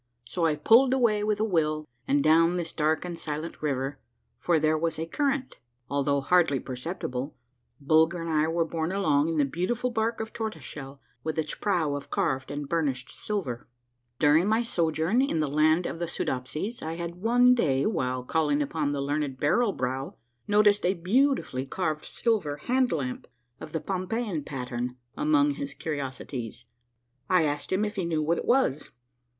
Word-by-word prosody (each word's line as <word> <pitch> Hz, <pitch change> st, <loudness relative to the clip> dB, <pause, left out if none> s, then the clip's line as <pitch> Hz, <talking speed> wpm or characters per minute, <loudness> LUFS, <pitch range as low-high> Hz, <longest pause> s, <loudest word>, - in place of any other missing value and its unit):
So 165 Hz, +7 st, 0 dB
I 155 Hz, -, +1 dB
pulled 240 Hz, -, +5 dB
away 220 Hz, -5 st, +2 dB
with 210 Hz, -1 st, 0 dB
a -, -, +2 dB
will, 155 Hz, -6 st, 0 dB, 0.2 s
and 140 Hz, 0 st, +3 dB
down 165 Hz, +3 st, +4 dB
this 170 Hz, -2 st, -3 dB
dark 155 Hz, +2 st, 0 dB
and 175 Hz, -2 st, -5 dB
silent 155 Hz, +2 st, -5 dB
river, 135 Hz, -2 st, -2 dB, 0.4 s
for 170 Hz, -2 st, +2 dB
there 155 Hz, 0 st, +2 dB
was 165 Hz, +1 st, -1 dB
a 160 Hz, -, -2 dB
current, 275 Hz, -, -1 dB, 0.3 s
although 140 Hz, 0 st, +1 dB
hardly 160 Hz, -2 st, +3 dB
per 130 Hz, -, -7 dB
ceptible, 130 Hz, -1 st, -4 dB, 0.4 s
Bulger 160 Hz, +4 st, +3 dB
and 165 Hz, 0 st, -3 dB
I 155 Hz, 0 st, +2 dB
were 165 Hz, 0 st, +1 dB
borne 165 Hz, +1 st, -2 dB
along 155 Hz, -6 st, +2 dB
in 165 Hz, -, -1 dB
the 145 Hz, -, +4 dB
beautiful 225 Hz, -, -1 dB
bark 225 Hz, 0 st, -1 dB
of 220 Hz, 0 st, -5 dB
tortoise 220 Hz, -1 st, -4 dB
shell 135 Hz, -1 st, -8 dB, 0.2 s
with 160 Hz, 0 st, -3 dB
its 155 Hz, -1 st, -1 dB
prow 170 Hz, -8 st, 0 dB
of 145 Hz, 0 st, -5 dB
carved 135 Hz, -10 st, -1 dB
and 145 Hz, 0 st, -4 dB
burnished 140 Hz, -5 st, -1 dB
silver. 170 Hz, -, -4 dB, 0.5 s
During 155 Hz, +6 st, +4 dB
my 220 Hz, +2 st, +2 dB
sojourn 170 Hz, +1 st, +1 dB
in 270 Hz, -, 0 dB
the 155 Hz, -, +1 dB
Land 155 Hz, +4 st, +3 dB
of 165 Hz, -, -4 dB
the 170 Hz, -, -2 dB
Soodopsies 155 Hz, -, -3 dB
I 160 Hz, +1 st, -3 dB
had 170 Hz, +1 st, -6 dB
one 245 Hz, +3 st, +5 dB
day, 140 Hz, -, +2 dB
while 130 Hz, -, -1 dB
calling 150 Hz, +1 st, +1 dB
upon 145 Hz, 0 st, -1 dB
the 140 Hz, -, -2 dB
learned 145 Hz, -1 st, -1 dB
Barrel 210 Hz, +9 st, +3 dB
Brow, 130 Hz, -2 st, -3 dB, 0.3 s
noticed 205 Hz, 0 st, +4 dB
a 185 Hz, +2 st, +2 dB
beauti 255 Hz, +11 st, +2 dB
fully 130 Hz, +1 st, -4 dB
carved 155 Hz, -2 st, -2 dB
silver 195 Hz, -12 st, 0 dB
hand 255 Hz, -, +1 dB
lamp 130 Hz, -5 st, -3 dB, 0.3 s
of 155 Hz, -, -9 dB
the 160 Hz, -, -1 dB
Pompeian 190 Hz, -2 st, -2 dB
pattern 125 Hz, -2 st, -4 dB, 0.2 s
among 295 Hz, -1 st, +3 dB
his 280 Hz, -1 st, -5 dB
curiosities. 130 Hz, -5 st, -5 dB, 0.6 s
I 180 Hz, -3 st, +4 dB
asked 145 Hz, -1 st, -2 dB
him 195 Hz, +3 st, +2 dB
if 210 Hz, +1 st, -5 dB
he 185 Hz, -, 0 dB
knew 160 Hz, -2 st, 0 dB
what 165 Hz, +3 st, +1 dB
it -, -, -5 dB
was. 240 Hz, -, +2 dB
160 Hz, 180 wpm, -27 LUFS, 145-205 Hz, 0.6 s, pulled